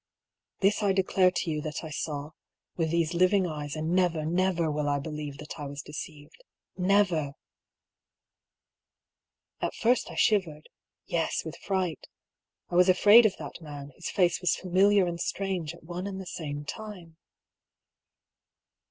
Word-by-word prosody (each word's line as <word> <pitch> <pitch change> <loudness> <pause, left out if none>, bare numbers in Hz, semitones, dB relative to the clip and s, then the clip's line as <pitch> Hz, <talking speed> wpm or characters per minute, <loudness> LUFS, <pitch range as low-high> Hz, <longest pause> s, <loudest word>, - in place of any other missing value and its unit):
(This 200 +2 +3
I 200 -2 +3
declare 190 -1 +3
to 175 -2 -2
you 150 -1 -2
that 150 +1 -5
I 160 - -7
saw, 145 0 -4 0.4
with 165 -2 0
these 170 0 +1
living 185 +2 +3
eyes, 150 -3 -4
and 155 +1 -2
never, 175 -4 +2
never 175 -1 +1
will 150 -1 -1
I 145 - +2
believe 150 -1 -5
that 150 +2 -9
I 145 - -4
was 140 +1 -7
deceived. 150 - -9 0.3
Never! 180 -6 +2 1.0
) - - -50
At - - -2
first 245 +2 +2
I - - -8
shivered 170 -8 +1 0.2
— - - -52
^yes, 165 -1 0
with 160 - -6
fright. 185 -4 -2 0.6
I - - -2
was 180 +1 +6
afraid 210 +5 +8
of 200 - -5
that - - -8
man, 145 -2 -8
whose - - -5
face 180 -3 +2
was 180 - +2
familiar 190 +2 +3
and 170 -1 -3
strange 185 -5 -2
at 170 - -18
one 175 +3 -5
and 195 -1 -5
the 190 - -7
same 145 -4 -5
time. 180 -4 -8
170 Hz, 160 wpm, -28 LUFS, 150-190 Hz, 1.0 s, afraid